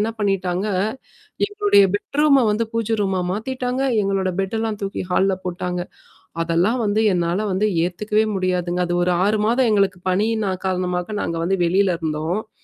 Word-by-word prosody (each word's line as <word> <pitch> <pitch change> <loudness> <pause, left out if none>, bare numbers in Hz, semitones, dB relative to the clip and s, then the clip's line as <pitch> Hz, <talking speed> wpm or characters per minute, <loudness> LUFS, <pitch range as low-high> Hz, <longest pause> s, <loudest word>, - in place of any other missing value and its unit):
என்ன 220 +2 0
பண்ணிட்டாங்க 195 -2 0 0.8
எங்களுடைய 410 - +4
பெட்ரூம 280 +2 +2
வந்து 215 +2 +1
பூஜ 230 -1 -1
ரூமா 190 -2 0
மாத்திட்டாங்க. 250 +4 -2 0.2
எங்களோட 195 -1 0
பெட்டெல்லாம் 220 +2 -2
தூக்கி 195 0 -3
ஹால்ல 190 +1 +2
போட்டாங்க. 180 0 -3 0.6
அதெல்லாம் 175 +9 +1
வந்து 210 +1 +1
என்னால 175 +1 0
வந்து 205 +3 +1 0.2
ஏத்துக்கவே 210 +4 0
முடியாதுங்க. 180 -1 -1
அது 175 - -1
ஒரு 180 - +2
6 210 +1 +1
மாதம் 240 +1 +2
எங்களுக்கு 195 -3 +2
பணியின் 215 +4 +1
நா - - 0 0.2
காரணமா 180 -1 -1 0.2
நாங்க 165 - -3
வந்து 195 +2 +1
வெளியில 185 +1 +2
இருந்தோம். 160 +4 -2
ஆ. 220 - -31
195 Hz, 150 wpm, -21 LUFS, 180-220 Hz, 0.8 s, எங்களுடைய